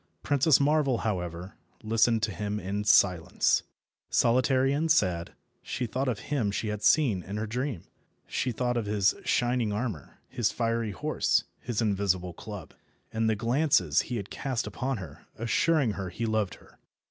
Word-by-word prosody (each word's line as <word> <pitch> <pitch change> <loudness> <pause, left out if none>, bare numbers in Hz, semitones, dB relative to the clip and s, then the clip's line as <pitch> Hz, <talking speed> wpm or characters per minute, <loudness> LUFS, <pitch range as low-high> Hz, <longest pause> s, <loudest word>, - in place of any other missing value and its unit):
Princess 145 +1 +4
Marvel, 140 -3 +2
however, 90 -3 -3 0.3
listened 115 0 +2
to 110 - +1
him 105 +3 -3
in 100 +2 -3
silence. 95 -4 +3 0.5
Solitary 130 +3 +3
and 160 +3 +1
sad, 90 - +1 0.3
she 125 - -3
thought 130 +4 -2
of 120 -5 0
him 125 -8 +1
she 105 +2 -2
had 105 -1 -4
seen 115 -5 +3
in 100 +4 -6
her 110 - -2
dream. 125 - -3 0.4
She 130 - -2
thought 120 +1 -1
of 110 -3 -2
his 105 -1 +2
shining 120 -3 +1
armour, 105 - -4
his 120 -3 0
fiery 115 -1 -1
horse, 95 - 0 0.2
his 120 -2 -2
invisible 95 -4 0
club, - - -9 0.4
and 110 0 +1
the 110 - +2
glances 115 - +2
he 125 - -5
had 100 -3 -6
cast 130 -4 -2
upon 130 +1 -3
her, 85 -8 -10
assuring 125 +3 +2
her 95 -2 -5
he 115 +6 -4
loved 110 -3 0
her. - - -21
110 Hz, 160 wpm, -28 LUFS, 100-125 Hz, 0.5 s, Princess